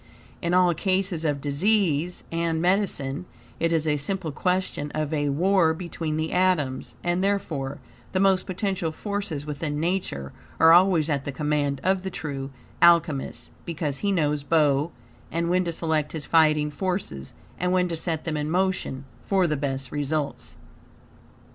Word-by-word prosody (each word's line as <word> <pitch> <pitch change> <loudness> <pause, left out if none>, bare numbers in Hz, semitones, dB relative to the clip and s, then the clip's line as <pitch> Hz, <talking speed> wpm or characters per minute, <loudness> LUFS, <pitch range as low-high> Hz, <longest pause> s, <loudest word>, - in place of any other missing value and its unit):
In 170 0 +1
all 180 -1 +5
cases 185 -1 0
of 145 -3 0
disease 170 +2 +1
and 165 -1 0
medicine, 175 -5 0 0.3
it 165 0 +1
is 160 -1 +1
a 150 -1 +2
simple 170 +2 -2
question 180 -2 -1
of 155 0 -1
A 145 -1 +1
WAR 170 +2 +3
BETWEEN 165 -2 -4
THE 160 0 -2
ATOMS, 175 -8 +1
and, 175 +1 +1
therefore, 155 -9 -1 0.3
the 185 - 0
most 190 -1 +3
potential 185 -3 -1
forces 200 -5 -4
within 150 0 -3
Nature 160 - -2 0.3
are 160 0 +8
always 175 -3 +5
at 145 -4 0
the 140 - -2
command 145 -1 -1
of 190 0 +2
the 190 - -4
true 140 -6 -5 0.3
Alchemist, 165 -5 +3
because 155 -4 -3
he 205 - 0
knows 150 -5 +1
bow 150 0 +2 0.4
and 170 +1 0
when 185 0 +2
to 170 - -1
select 160 -2 -1
his 155 -3 -5
fighting 155 -2 +3
forces, 180 - -4 0.2
and 180 +1 +1
when 180 0 +3
to 170 - -3
set 160 -1 -3
them 160 -2 -1
in 150 0 -2
motion, 180 -6 -1 0.2
for 190 -2 +2
the 155 -3 +1
best 135 -2 -3
results. 145 0 -3
160 Hz, 160 wpm, -25 LUFS, 145-180 Hz, 0.4 s, are